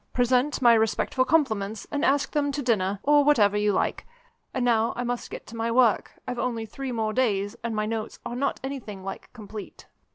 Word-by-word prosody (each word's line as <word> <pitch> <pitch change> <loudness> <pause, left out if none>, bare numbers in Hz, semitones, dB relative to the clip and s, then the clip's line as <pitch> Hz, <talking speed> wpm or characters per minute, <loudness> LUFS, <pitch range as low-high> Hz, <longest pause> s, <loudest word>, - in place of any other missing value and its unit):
Present 255 +3 +2
my 235 -1 +8
respectful 225 +3 +1
compliments, 220 -8 0
and 290 0 -1
ask 285 -1 +2
them 285 -1 0
to 285 0 -3
dinner, 200 -5 +1
or 295 0 +5
whatever 215 -9 +4
you 210 0 +2
like. 190 - -1 0.4
And 255 -2 -1
now 230 -2 +2
I 245 - -2
must 245 0 -3
get - - -8
to 230 - -11
my 230 0 -1
work 235 -2 +3
I've 250 -1 -3
only 235 -3 -2
three 265 +4 -6
more 220 -2 -1
days, 205 -4 0
and 230 -1 -2
my 215 0 0
notes 220 0 -4
are 240 - -4
not 275 +3 -1
anything 240 -8 -6
like 195 - -7
complete." 215 -1 -10
235 Hz, 200 wpm, -26 LUFS, 215-260 Hz, 0.4 s, my